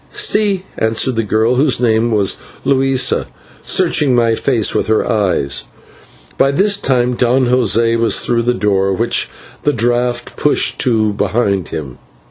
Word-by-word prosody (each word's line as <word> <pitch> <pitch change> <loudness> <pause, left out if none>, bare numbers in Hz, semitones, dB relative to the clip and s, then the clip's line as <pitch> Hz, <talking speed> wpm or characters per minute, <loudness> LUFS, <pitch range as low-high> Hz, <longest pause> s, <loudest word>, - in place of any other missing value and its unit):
"/Si/," 205 -3 +1 0.2
answered 115 +3 0
the 115 - +1
girl, 110 +3 0
whose 140 -1 +1
name 115 -1 +1
was 105 -4 0 0.3
Luisa, 135 -1 +1 0.3
searching 135 -4 +2
my 115 -1 +2
face 115 -1 0
with - - -1
her 110 0 +1
eyes. 95 - -1 0.7
By 135 - +4
this 200 +8 +2
time 125 -7 0
Don 125 +2 +1
José 115 -2 +1
was 115 - +2
through 120 -1 0
the 120 +1 0
door, 100 -3 0
which 115 +5 -1 0.3
the 145 - +1
draught 120 +1 -1
pushed 150 - +1
to 110 -5 +1
behind 100 -2 -1
him. 70 -5 -7
120 Hz, 145 wpm, -15 LUFS, 110-130 Hz, 0.7 s, By